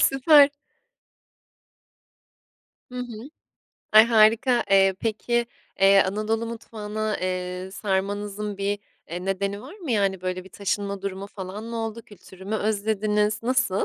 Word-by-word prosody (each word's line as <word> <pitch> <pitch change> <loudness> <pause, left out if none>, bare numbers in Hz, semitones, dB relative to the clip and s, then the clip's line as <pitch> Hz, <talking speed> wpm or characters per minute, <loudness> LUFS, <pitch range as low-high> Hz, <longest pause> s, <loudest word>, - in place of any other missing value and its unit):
Süper! 285 +1 +6 2.4
Hı 250 - -9
hı. 245 +2 -7 0.6
Ay, 215 +1 +9
harika! 230 +2 +4
Eee, 195 -1 +5
peki, 235 +2 0 0.3
eee, 195 0 +7
Anadolu 215 +4 -1
mutfağına, 215 -2 -4
eee, 185 0 -3
sarmanızın 205 +1 -3
bir, 200 +1 -1 0.3
eee, 180 +2 -5
nedeni 200 +1 -2
var 295 +9 -11
mı? 325 -9 -6
Yani, 195 -4 +1
böyle, 185 0 -4
bir 190 - -13
taşınma 200 0 -3
durumu 195 0 -4
falan 200 +1 -8
mı 230 0 -5
oldu? 225 0 -4
Kültürü 190 -2 -15
mü 210 +3 -3
özlediniz? 210 0 0
Nasıl? 255 -5 +1
210 Hz, 125 wpm, -24 LUFS, 195-225 Hz, 2.4 s, Ay